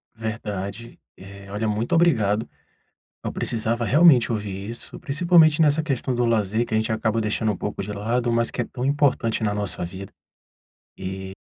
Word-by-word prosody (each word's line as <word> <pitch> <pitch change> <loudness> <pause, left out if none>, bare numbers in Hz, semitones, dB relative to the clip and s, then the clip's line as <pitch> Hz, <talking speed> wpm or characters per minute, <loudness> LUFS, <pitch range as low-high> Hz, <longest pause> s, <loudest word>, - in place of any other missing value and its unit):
Verdade. 110 -1 -5 0.2
Eh, 100 +1 -12
olha 105 +2 -2
muito 110 +2 -1
obrigado, 110 -11 +2 0.7
eu - - -3
precisava 115 +1 -1
realmente 145 -3 +5
ouvir 100 -2 -4
isso, 120 - -8
principalmente 165 0 +4
nessa 150 0 +4
questão 135 -4 -2
do 120 0 +1
lazer 110 0 +1
que - - -7
a - - +3
gente 110 +1 -1
acaba 110 0 0
deixando 110 0 0
um 100 - -5
pouco 105 - -4
de 100 +2 -5
lado, 120 +4 -1
mas 115 0 +1
que - - -2
é - - -2
tão 125 +1 -5
importante 140 -6 +1
na 105 -1 +1
nossa 105 -3 -2
vida. 95 +3 -9 0.9
E 95 0 -6
115 Hz, 175 wpm, -23 LUFS, 105-125 Hz, 0.9 s, realmente